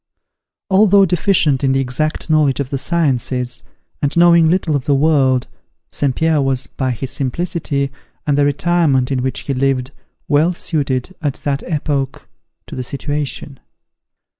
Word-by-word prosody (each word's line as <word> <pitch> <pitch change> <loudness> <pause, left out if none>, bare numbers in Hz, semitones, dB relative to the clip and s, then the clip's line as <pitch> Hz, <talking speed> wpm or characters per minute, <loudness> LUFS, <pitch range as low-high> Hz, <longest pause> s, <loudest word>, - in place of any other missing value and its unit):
Although 200 0 +5
deficient 165 -6 +2
in 135 -1 +2
the 135 - +2
exact 135 +4 -2
knowledge 155 -4 +2
of 135 -2 -3
the 135 - -1
sciences, 130 -6 0 0.4
and 145 +3 -1
knowing 170 -1 +6
little 170 -3 +1
of 135 -3 -2
the 145 - +2
world, 135 -4 +2 0.5
St. 135 -3 0
Pierre 160 -2 +2
was, 135 -1 0
by 130 -1 -3
his 125 +2 -3
simplicity, 140 -1 -2 0.3
and 145 - +1
the 145 - +3
retirement 145 -3 +1
in 130 -2 0
which 130 +1 -2
he 140 - -3
lived, 130 0 0 0.4
well 155 +4 +3
suited, 140 -1 -2
at 145 -4 -1
that 140 -1 0
epoch, 140 -4 -2 0.4
to - - -9
the 130 - -4
situation. 140 0 -4
140 Hz, 150 wpm, -17 LUFS, 130-160 Hz, 0.5 s, knowing